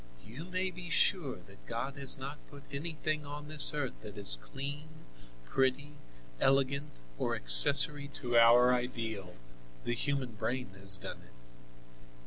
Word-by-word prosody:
You 125 +10 -10
may 185 +1 -4
be 175 0 -10
sure 170 -5 0
that 95 +2 -20
God 130 +4 -6
has 140 -1 +4
not 140 +2 -9
put 140 -1 -15
anything 155 +1 -5
on 145 +1 -10
this 150 -2 +5
earth 145 -4 -5
that 105 0 -12
is 100 -12 +6
clean, 140 - -9 0.6
pretty, 135 - -2 0.5
elegant 140 +2 0 0.3
or - - -2
accessory 140 - +7
to 120 -2 -5
our 120 +2 +5
ideal; 115 -7 -6 0.5
the 120 - -3
human 135 +1 -4
brain 120 +1 -6
has 95 0 +1
done - - -10
it. - - -20
135 Hz, 140 wpm, -30 LUFS, 115-145 Hz, 0.6 s, accessory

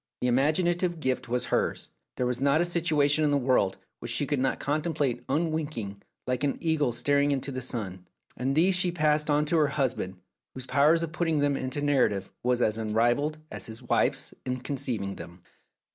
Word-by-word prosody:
The 125 - +1
imaginative 170 +7 +1
gift 130 -4 -2
was 125 +1 0
hers; - - -1 0.3
there 125 - 0
was 125 0 -1
not 140 +2 +3
a 175 - +3
situation 155 -4 +2
in 150 - +3
the 145 - +3
world 125 -8 +2 0.2
which 120 - -6
she 120 +5 +1
could 140 0 -1
not 130 0 0
contemplate 150 -3 -1
un 160 +4 +1
winking, 120 -11 -4 0.2
like 125 +1 -1
an 145 - 0
eagle 160 -6 +1
staring 140 +4 +2
into 140 0 -2
the 130 -1 -4
sun, 95 -8 -5 0.3
and 130 +3 -1
these 180 +5 +4
she 180 0 +3
passed 155 -2 +1
on 150 +1 +3
to 165 +2 +1
her 150 -2 +4
husband, 130 -9 -2 0.4
whose 130 -1 -7
power 140 +4 +4
of 165 -1 -1
put 175 0 -1
ting 160 -2 +1
them 145 -1 +2
into 130 +2 -3
narrative 125 -9 +1
was 125 0 +1
as 110 +1 +1
unrivalled 120 +8 +1
as - - -6
his 115 +2 -9
wife's 125 - 0
in 125 0 -3
conceiving 120 -8 -2
them. 85 +1 -11
140 Hz, 195 wpm, -27 LUFS, 125-155 Hz, 0.4 s, these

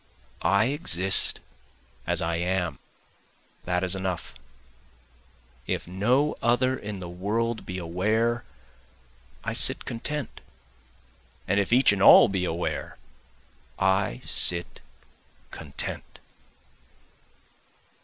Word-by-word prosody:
I 100 +2 +3
exist 95 - +2 0.7
as - - +2
I 85 0 -1
am, 90 -4 -2 0.9
that 90 +1 0
is 90 0 +3
enough, 95 -6 -4 1.3
If - - -3
no 120 +11 +1
other 125 +2 +2
in 105 -5 -7
the 90 - -6
world 110 +6 -2
be 90 - -5
aware 110 +8 0 1.0
I - - -3
sit - - 0
content, 145 +4 -5 1.1
And 100 +2 +2
if 100 - -1
each 125 0 +6
and 100 - -3
all - - +8
be 95 -2 -1
aware 85 0 -3 0.8
I 95 -9 +1
sit 85 0 +1 0.7
content. - - -7
95 Hz, 95 wpm, -26 LUFS, 90-115 Hz, 1.3 s, all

